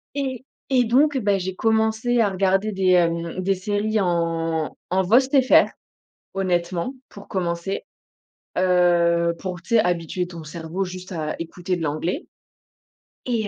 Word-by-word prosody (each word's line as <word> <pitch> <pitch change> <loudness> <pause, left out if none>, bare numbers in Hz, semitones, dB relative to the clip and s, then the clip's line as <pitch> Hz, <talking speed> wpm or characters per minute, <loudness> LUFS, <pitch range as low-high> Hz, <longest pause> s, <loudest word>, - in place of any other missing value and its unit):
et 265 -3 -3 0.3
et 255 -1 +4
donc, 270 +5 +3
bah, 205 -4 +1
j'ai 185 0 -4
commencé 220 +3 +2
à 210 - +3
regarder 195 +2 +1
des, 190 -1 +2
hem, 170 0 +1
des 195 +1 +1
séries 205 +3 -1
en 165 -3 -1 0.2
en 190 +1 +3
VOST 260 +8 +4
FR 260 - +5 0.6
honnêtement, 180 +3 -1 0.2
pour 200 - -12
commencer. 175 +1 -2 0.7
Heu, 175 -2 +3
pour 180 -2 -5
tu 230 +7 -1
sais - - +7
habituer 175 0 -1
ton 170 -2 -9
cerveau 165 +4 -4
juste 185 +1 -8
à 155 -3 -3
écouter 175 +2 -3
de 165 - -4
l'anglais. 160 - -2 1.0
Et, 230 -4 -1
185 Hz, 145 wpm, -23 LUFS, 170-215 Hz, 1.0 s, sais